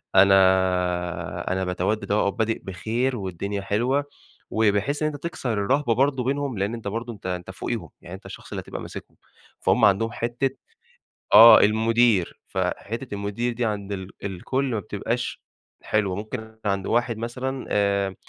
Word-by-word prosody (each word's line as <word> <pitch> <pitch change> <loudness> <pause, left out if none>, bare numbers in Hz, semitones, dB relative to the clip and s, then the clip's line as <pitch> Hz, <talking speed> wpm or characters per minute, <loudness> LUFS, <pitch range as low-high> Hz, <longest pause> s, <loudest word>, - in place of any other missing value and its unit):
أنا 95 0 +7
آآ، 90 -3 +1
أنا 95 0 0
باتودّد 95 +3 -1
أهو 105 0 +2
وبادئ 110 +3 -1
بخير 115 +7 -2
والدنيا 100 +1 -4
حلوة، 125 +8 0 0.4
وبحيث 110 +7 +1
إن - - +3
أنت 145 - -9
تكسر 135 -8 -3
الرهبة 120 +5 +1
برضه 135 0 +2
بينهم 135 -1 -1
لأن 100 +3 -1
أنت 115 -3 -6
برضه 115 +3 -4
أنت 105 - -16
أنت 90 -1 -4
فوقيهم، - - -4
يعني 85 - -9
أنت 95 - -14
الشخص - - -10
اللي - - -3
هتبقى - - -7
ماسِكهُم، - - -9 0.4
فهم - - +3
عندهم 105 +3 +3
حتِّة 120 +4 -1 0.8
آه، 115 +3 +10
المدير، 110 -2 +3
فحتِّة 115 +2 -3
المدير 100 +4 -2
دي 120 +1 -2
عند 105 -2 -3
ال 95 -1 -5
الكل 100 +8 -2
ما 120 -5 -1
بتبقاش 110 +4 -3 0.4
حلوة، 100 -4 0
ممكن 110 +1 -6
عند 100 -2 -1
واحد 120 -1 +1
مثلًا 130 +3 -4
آآ، 100 -1 +1
105 Hz, 155 wpm, -24 LUFS, 100-120 Hz, 0.8 s, آه